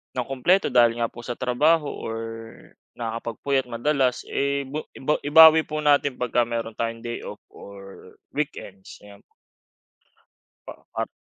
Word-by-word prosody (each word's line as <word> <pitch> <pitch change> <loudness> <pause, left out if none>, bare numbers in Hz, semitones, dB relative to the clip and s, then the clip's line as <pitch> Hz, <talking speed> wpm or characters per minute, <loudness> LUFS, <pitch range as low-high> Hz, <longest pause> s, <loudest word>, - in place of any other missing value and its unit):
nang 125 -1 -2
kumpleto 145 +7 +1
dahil 120 -1 +4
nga 115 -1 -1
po - - -12
sa 120 - -4
trabaho 145 +5 +1
or 115 0 -6 0.8
nakakapagpuyat 120 +3 -3
madalas, 130 +1 0
eh, 140 0 -1
ba 145 +4 -5
iba 150 +3 -1
ibawi 160 +2 +8
po 155 - -4
natin 145 -2 +2
pagka 125 0 0
mayro'n 115 -1 -4
tayong 115 +1 -4
day 120 0 -5
off - - -8 0.2
or 100 -1 -13 0.2
weekends, 100 -10 -6
ayan. 100 -1 -15 1.5
Pa - - -7 0.3
at - - -1
125 Hz, 140 wpm, -24 LUFS, 115-145 Hz, 1.5 s, ibawi